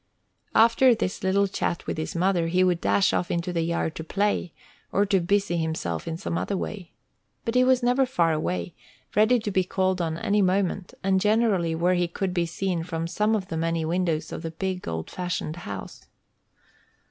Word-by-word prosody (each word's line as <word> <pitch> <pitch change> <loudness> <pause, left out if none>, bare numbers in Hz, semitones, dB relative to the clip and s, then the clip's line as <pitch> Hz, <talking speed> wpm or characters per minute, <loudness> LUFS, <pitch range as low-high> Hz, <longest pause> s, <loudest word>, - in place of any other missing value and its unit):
After 235 +2 +6
this 200 -4 -3
little 200 +1 +3
chat 175 -2 -2
with - - -2
his 155 - -4
mother, 175 -1 +2
he 180 +2 +3
would 180 -2 +2
dash 195 - +3
off 175 - 0
into 170 +1 -2
the 170 - 0
yard 165 -1 -1
to 160 - -4
play, 200 0 0 0.4
or 200 - +2
to 195 -1 +2
busy 190 0 +1
himself 160 - -2
in 160 - -3
some 170 -2 -2
other 200 - -2
way. 190 -2 -6 0.5
But 230 - -1
he 250 0 +5
was 255 -1 +3
never 250 +2 +3
far 170 -10 +2
away, 90 - -2 0.4
ready 220 +4 +5
to 215 -2 -3
be 185 -1 +2
called 185 0 0
any 170 +5 0
moment, 190 0 0
and 190 0 +2
generally 210 -6 +2
where 175 +3 +2
he 175 -1 +1
could 185 +2 -3
be 175 -2 0
seen 175 0 -2
from 165 -1 -3
some 210 +6 +1
of 190 -3 -3
the 165 - -3
many 165 0 0
windows 170 -1 -1
of - - -5
the 165 - -4
big, 185 +2 -4
old 80 -1 -4
fashioned 175 -3 -3
house. 100 - -8
180 Hz, 195 wpm, -25 LUFS, 165-200 Hz, 0.5 s, After